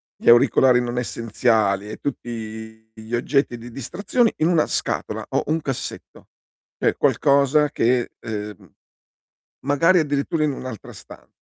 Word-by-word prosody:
gli -, -, 0 dB
auricolari 125 Hz, +1 st, +5 dB
non 120 Hz, 0 st, -3 dB
essenziali 110 Hz, -4 st, 0 dB
e -, -, -7 dB
tutti 110 Hz, -4 st, -7 dB
gli 110 Hz, +2 st, -11 dB
oggetti 125 Hz, +1 st, 0 dB
di 120 Hz, +1 st, -10 dB
distrazione 190 Hz, -, 0 dB
in 155 Hz, -, +2 dB
una 170 Hz, -3 st, +3 dB
scatola -, -, -3 dB
o -, -, -1 dB
un 160 Hz, +2 st, +1 dB
cassetto, 135 Hz, -3 st, -6 dB, 0.5 s
cioè -, -, +1 dB
qualcosa 140 Hz, +2 st, +3 dB
che 120 Hz, -2 st, 0 dB
ehm, 105 Hz, -4 st, -7 dB, 0.9 s
magari 165 Hz, +6 st, +4 dB
addirittura 150 Hz, +1 st, -1 dB
in 150 Hz, -, +1 dB
un'altra 130 Hz, -5 st, -8 dB
stan -, -, -14 dB
125 Hz, 130 wpm, -22 LUFS, 110-145 Hz, 0.9 s, auricolari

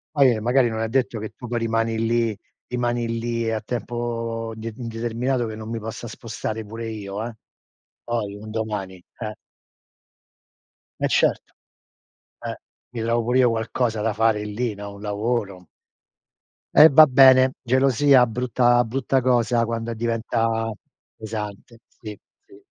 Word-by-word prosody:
Poi, 140 Hz, -3 st, +6 dB
ehm, 110 Hz, -, -5 dB
magari 125 Hz, 0 st, +3 dB
non 110 Hz, 0 st, -4 dB
è 115 Hz, -, 0 dB
detto 125 Hz, -2 st, 0 dB
che 110 Hz, 0 st, -5 dB
tu 125 Hz, -, -9 dB
poi 120 Hz, 0 st, -2 dB
rimani 115 Hz, 0 st, 0 dB
lì 115 Hz, -1 st, 0 dB, 0.3 s
rimani 120 Hz, -1 st, -1 dB
lì 115 Hz, -1 st, -2 dB
a 110 Hz, -, -1 dB
tempo, 115 Hz, -2 st, -4 dB
uhm, 110 Hz, -, -11 dB
de 115 Hz, +1 st, -5 dB
indeterminato 120 Hz, +1 st, -2 dB
che 110 Hz, -, -6 dB
non 110 Hz, 0 st, -8 dB
mi 115 Hz, -, -3 dB
possa 115 Hz, +2 st, -7 dB
spostare 110 Hz, -1 st, -5 dB
pure 115 Hz, +2 st, -7 dB
io, 105 Hz, -1 st, -5 dB
eh, 120 Hz, -, -6 dB, 0.7 s
poi 105 Hz, -4 st, -3 dB
un 110 Hz, +1 st, -10 dB
domani, 105 Hz, -5 st, -4 dB, 0.2 s
eh. 110 Hz, -2 st, -5 dB, 1.6 s
Eh -, -, +1 dB
certo. -, -, +1 dB, 0.9 s
Eh, -, -, -5 dB, 0.3 s
mi 120 Hz, -2 st, -6 dB
trovo 115 Hz, 0 st, +1 dB
pure 125 Hz, +2 st, +2 dB
io 125 Hz, -2 st, +5 dB
qualcosa 115 Hz, 0 st, -1 dB
da 110 Hz, 0 st, 0 dB
fare 105 Hz, -1 st, +1 dB
lì, 105 Hz, +1 st, -3 dB
no, 100 Hz, 0 st, -8 dB
un 100 Hz, -, -12 dB
lavoro. 105 Hz, -3 st, -2 dB, 1.1 s
Eh 155 Hz, +2 st, +10 dB
va 155 Hz, +2 st, +9 dB
bene, 130 Hz, -1 st, +6 dB
gelosia, 130 Hz, +1 st, +4 dB
brutta 120 Hz, +1 st, +2 dB
brutta 130 Hz, +3 st, 0 dB
cosa 120 Hz, -2 st, +2 dB
quando 115 Hz, 0 st, -3 dB
e -, -, -4 dB
diventa 115 Hz, 0 st, -1 dB, 0.4 s
pesante. 110 Hz, +1 st, -7 dB
Sì, 105 Hz, -2 st, -10 dB, 0.2 s
sì. 390 Hz, -1 st, -18 dB
115 Hz, 150 wpm, -23 LUFS, 110-120 Hz, 1.6 s, Eh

